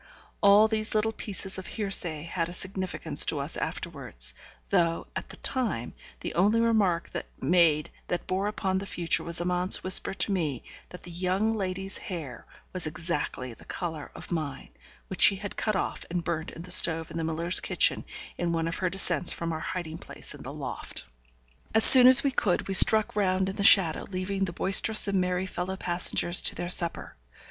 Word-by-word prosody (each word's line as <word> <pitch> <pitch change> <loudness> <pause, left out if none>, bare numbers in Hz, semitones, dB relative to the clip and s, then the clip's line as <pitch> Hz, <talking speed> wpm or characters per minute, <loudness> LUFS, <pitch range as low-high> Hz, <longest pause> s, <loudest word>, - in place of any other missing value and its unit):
All 200 +2 +5
these 220 0 -3
little 215 +1 0
pieces 195 -3 -4
of 190 - -10
hearsay 180 -8 -2
had 170 0 -4
a - - -9
significance 185 0 -2
to - - 0
us - - -5
afterwards, - - -2 0.4
though, 165 -1 0
at - - -7
the - - -9
time, 220 - -3 0.3
the - - -6
only 205 +7 +1
remark 210 -7 0 0.3
made 155 0 +1 0.2
that 175 - -4
bore 190 +2 -3
upon 190 -3 -3
the 195 - -8
future 170 -3 -2
was 170 0 +1
Amante's 180 +1 0
whisper 185 +1 +5
to 205 - -2
me 155 -9 -3 0.3
that 180 - -13
the 175 - -10
young 185 +5 -2
lady's 195 -1 -4
hair 155 -10 -9 0.3
was 180 -4 -3
exactly 155 -6 -5
the - - -18
colour 160 -5 -7
of - - -12
mine, 155 -5 -5 0.4
which 190 - -7
she 200 - +8
had 200 +1 -8
cut 215 -2 -2
off - - -4
and 175 0 -4
burnt 165 -2 -4
in 165 - -11
the 180 - -8
stove 165 -2 +5
in 165 - -7
the 165 - -3
miller's 165 +3 +1
kitchen - - +1 0.4
in 175 -1 -2
one 165 -1 -2
of 165 - -4
her 185 - -2
descents 185 -1 0
from 165 -1 -5
our 160 - -5
hiding 165 -1 -7
place - - -9
in - - -13
the - - -9
loft. - - -8 0.7
As 220 - +5
soon 255 -1 +11
as 260 +1 +7
we 280 - 0
could, 190 -8 -2
we 195 - -4
struck 215 +3 +6
round 190 -2 -1
in 195 - -7
the - - -5
shadow, 190 -6 +4
leaving 195 +1 -3
the 180 - -5
boisterous 210 +4 +2
and 195 -2 0
merry 180 +1 -2
fellow 185 0 -6
passengers 175 -1 +3
to - - +1
their 175 - -6
supper. 170 -2 -1
180 Hz, 190 wpm, -26 LUFS, 170-195 Hz, 0.7 s, soon